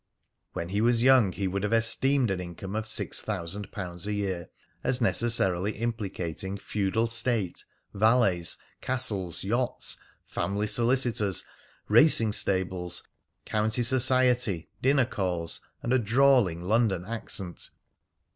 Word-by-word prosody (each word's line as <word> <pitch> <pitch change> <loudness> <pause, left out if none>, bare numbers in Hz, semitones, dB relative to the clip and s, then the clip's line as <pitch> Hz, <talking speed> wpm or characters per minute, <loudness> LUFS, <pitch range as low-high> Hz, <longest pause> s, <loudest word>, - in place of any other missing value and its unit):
When 85 - -5
he 100 +3 -1
was 120 0 +2
young 130 -7 +5
he 95 +2 -3
would 95 +1 -2
have 105 - -2
esteemed 120 +2 +2
an 95 - -2
income 90 +3 -7
of 110 0 -3
six - - 0
thousand 100 0 -5
pounds 90 -1 -6
a 105 - -2
year 95 -4 -3 0.3
as 125 - +1
necessarily 110 -5 +1
implicating 100 -5 -4
feudal 105 +3 -1
state, 115 -4 -2 0.3
valets, 105 -6 +2 0.2
castles, 105 -9 -1
yachts, 120 +5 -1 0.3
family 100 +4 -2
solicitors, 115 -4 +2 0.4
racing 115 -2 +4
stables, 95 -3 0 0.4
county 110 +3 0
society, 125 -7 +2
dinner 135 0 +3
calls, 90 -7 -1 0.2
and 120 - 0
a 130 - +4
drawling 120 -6 +3
London 100 -3 +1
accent. 100 -5 -3
105 Hz, 120 wpm, -27 LUFS, 95-120 Hz, 0.4 s, young